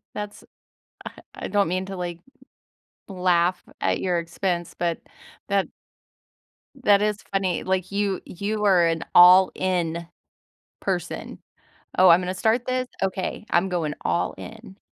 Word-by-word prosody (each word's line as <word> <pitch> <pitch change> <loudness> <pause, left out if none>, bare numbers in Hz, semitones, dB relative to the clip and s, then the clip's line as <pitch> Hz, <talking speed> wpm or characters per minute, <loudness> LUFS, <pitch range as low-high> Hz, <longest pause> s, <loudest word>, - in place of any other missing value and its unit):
That's 210 0 -7 0.7
I - - -12
I - - -5
don't 205 -3 +2
mean 185 +2 -2
to, 195 - -6
like, 175 -1 -5 0.9
laugh 180 -2 +1 0.2
at - - 0
your 180 -2 0
expense, 175 +1 -3
but 170 -1 -2 0.5
that 200 -1 +1 1.1
that 210 -7 +3
is 210 0 -1
funny, 190 -2 0
like, 185 -1 -1
you 200 -1 -1
you 210 +3 -3
are 180 -4 +5
an 165 0 0
all-in 180 -2 +5 0.7
person. - - -4 0.6
"Oh, 185 0 +7
I'm 170 +2 +7
gonna 180 +1 -3
start 225 +5 +1
this? 255 0 -1 0.2
Okay. 190 +2 -3
I'm 180 +2 +2
going 165 -5 -1
all 85 +1 -1
in." 95 - -11
185 Hz, 135 wpm, -24 LUFS, 175-200 Hz, 1.1 s, Oh